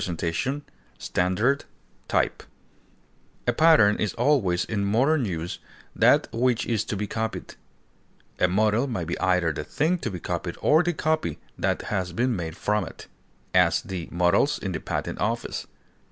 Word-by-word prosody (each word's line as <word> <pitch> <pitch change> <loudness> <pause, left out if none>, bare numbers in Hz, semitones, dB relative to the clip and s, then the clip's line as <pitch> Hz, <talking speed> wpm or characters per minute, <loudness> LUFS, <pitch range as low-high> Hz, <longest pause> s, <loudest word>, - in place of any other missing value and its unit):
example, 90 - -2 0.5
mold, 105 +10 +2 1.8
A 120 - +2
pattern 150 -8 +5
is 105 - -2
always, 120 -9 +2
in 100 -2 -2
modern 130 +8 +2
use, 85 -3 -4 0.4
that - - +4
which 120 0 +1
is 110 -3 0
to 105 - -3
be 105 - -2
copied; 110 +2 -4 0.9
a 90 - +4
model 105 +7 +2
may 115 -9 -3
be 85 - -4
either 90 -3 +2
the 75 - -4
thing 165 - 0
to 115 - -3
be 90 -3 -6
copied - - -4
or 155 +2 +4
the 175 0 0
copy 155 0 -1 0.2
that - - -1
has 90 -3 -1
been 120 +5 +1
made 85 -3 -5
from 105 -1 0
it; - - -10 0.5
as, 90 +2 +4
the 95 -7 -5
models 90 +11 +2
in 95 - -4
the 90 - -3
Patent - - -4
Office. - - -2
105 Hz, 155 wpm, -25 LUFS, 90-130 Hz, 1.8 s, pattern